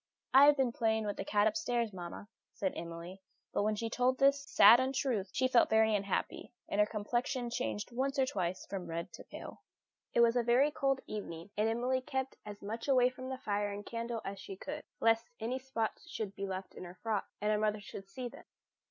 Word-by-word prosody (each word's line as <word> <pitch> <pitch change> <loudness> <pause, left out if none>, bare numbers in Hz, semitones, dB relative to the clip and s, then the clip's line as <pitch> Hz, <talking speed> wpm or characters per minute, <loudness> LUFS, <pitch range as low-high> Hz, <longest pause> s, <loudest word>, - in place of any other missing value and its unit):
"I 270 +2 +9
have 295 0 +6
been 260 -3 +2
playing 220 -1 +1
with 205 - -3
the - - -2
cat 205 0 +2
upstairs, 235 -2 0
mamma," 180 +2 -7 0.3
said 190 -2 -1
Emily. 170 +3 -7 0.3
But - - +1
when 215 +1 +1
she 230 +2 -2
told 250 +3 +1
this 275 +1 +4
sad 245 -2 +8
untruth 260 -6 0
she 260 - +2
felt 250 -2 +4
very 220 0 +4
unhappy, 200 -1 -2 0.2
and 200 - -2
her 210 - +4
complexion 240 +3 -2
changed 245 -3 -3
once 270 +4 -1
or 265 - +4
twice 185 -6 -2
from 190 -3 -5
red 165 0 -4
to - - -10
pale. - - -10 0.5
It 235 - +6
was 235 0 +5
a 245 +4 +4
cold 270 -2 0
evening, 180 -3 -6
and 215 +2 +2
Emily 250 +3 0
kept 265 +1 -3
as 205 -1 -8
much 225 +5 -5
away 255 -2 +5
from 255 0 -8
the 260 - -3
fire 205 -4 -1
and 200 0 -6
candle 230 -1 -4
as 195 0 -5
she 195 - -7
could, 290 +9 -6 0.2
lest 225 +1 +3
any 240 +4 -2
spots 255 +2 -3
should 210 -9 -4
be 195 0 -4
left 190 0 -5
in - - -9
her 180 0 -9
frock, 220 -3 -1
and 210 +1 +1
her 210 - +2
mother 215 0 +1
should 195 -1 -9
see 250 +5 -5
them. - - -12
225 Hz, 215 wpm, -33 LUFS, 205-255 Hz, 0.5 s, I